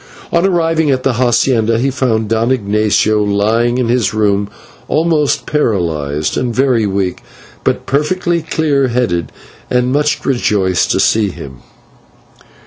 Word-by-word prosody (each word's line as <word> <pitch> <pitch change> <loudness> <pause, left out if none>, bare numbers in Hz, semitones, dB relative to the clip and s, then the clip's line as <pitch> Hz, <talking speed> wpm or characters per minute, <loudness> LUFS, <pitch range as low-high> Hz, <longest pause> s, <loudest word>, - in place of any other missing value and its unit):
On 170 - +2
arriving 165 -4 +1
at 130 -2 0
the 135 - +2
/hacienda/ 120 -2 +1
he 135 +3 0
found 120 -5 0
Don 115 +3 0
Ignatio 105 -2 +1
lying 110 +4 +1
in 125 -2 0
his 115 -3 0
room, 100 -1 +1 0.4
almost 155 -2 +1
paralysed 80 - -1
and 125 -1 -1
very 125 -5 +2
weak, 95 -2 -2 0.4
but - - -1
perfectly 170 +4 0
clear 150 -4 0
headed 115 -9 -1 0.4
and 125 +1 +1 0.3
rejoiced 100 -8 +1
to - - +1
see 110 -2 +2
him. 65 -7 -10
120 Hz, 130 wpm, -14 LUFS, 105-135 Hz, 0.4 s, On